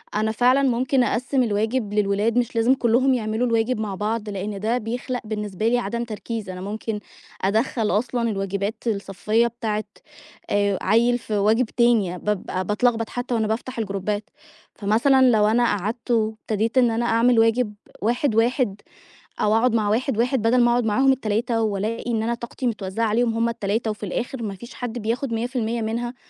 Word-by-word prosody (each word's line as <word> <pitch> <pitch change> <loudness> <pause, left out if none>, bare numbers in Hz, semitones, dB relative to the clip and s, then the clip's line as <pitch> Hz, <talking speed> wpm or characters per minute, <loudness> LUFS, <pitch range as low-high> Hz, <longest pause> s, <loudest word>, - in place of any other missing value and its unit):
أنا 215 +1 +1
فعلًا 250 +4 +3
ممكن 255 0 +2
أقسِّم 255 +2 +1
الواجب 220 0 -1
للولاد 210 +2 +1
مش 240 -1 0
لازم 230 +3 +4
كلّهم 255 +2 +3
يعملوا 225 0 0
الواجب 230 0 +1
مع 210 -3 -3
بعض، 215 +2 -2
لأن 200 0 -4
ده 225 +4 0
بيخلَق 245 +2 -4
بالنسبة 210 -1 -3
لي 245 +2 +3
عدم 235 +1 -3
تركيز، 225 -2 -5
أنا 180 0 -6
ممكن 210 +2 -4 0.4
أدخّل 220 +3 +1
أصلًا 235 +3 0
الواجبات 200 +2 -3
الصفيّة 210 +2 0
بتاعة 220 -2 -3 0.7
آآ 200 -2 +1
عيّل 235 +4 +3
في 220 -3 -3
واجب 220 +5 +3
تاني، 220 -6 +2
بابقى 185 -2 -2
باتلخبط 225 +2 +1
حتى 245 0 -4
وأنا 220 -2 +1
بافتَح 235 +3 -3
الجروبات، 205 0 -3 0.5
فمثلًا 250 +6 +4
لو 210 -2 +4
أنا 235 +3 +3
قعَدت 215 +3 -2
وابتديت 220 0 0
إن 245 -3 +5
أنا 235 +1 0
أعمل 235 +1 +3
واجب 225 -1 +2 0.3
واحد، 240 +2 +1
واحد 225 -3 +1 0.6
أو 210 +1 +3
أقعد 245 +1 +2
مع 215 -2 +1
واحد، 230 +1 0
واحد 250 0 +1
بدَل 240 +2 +3
ما 240 0 +5
أقعُد 240 0 +2
معاهم 265 +5 +3
ال3 230 -1 0
وألاقي 220 +3 -2
إن 220 -1 0
أنا 235 +2 0
طاقتي 235 +2 -6
متوّزعة 210 -1 -2
عليهم 230 +2 +1
هُم 230 +1 +1
التلاتة 225 -1 -1
وفي 210 -1 -5
الآخِر 240 +5 -4
ما 200 -3 -3
فيش 235 +5 -11
حَد 245 -1 -5
بياخد 230 +3 -2
100% 235 0 -2
منها، 235 +3 -3
225 Hz, 170 wpm, -23 LUFS, 210-240 Hz, 0.7 s, إن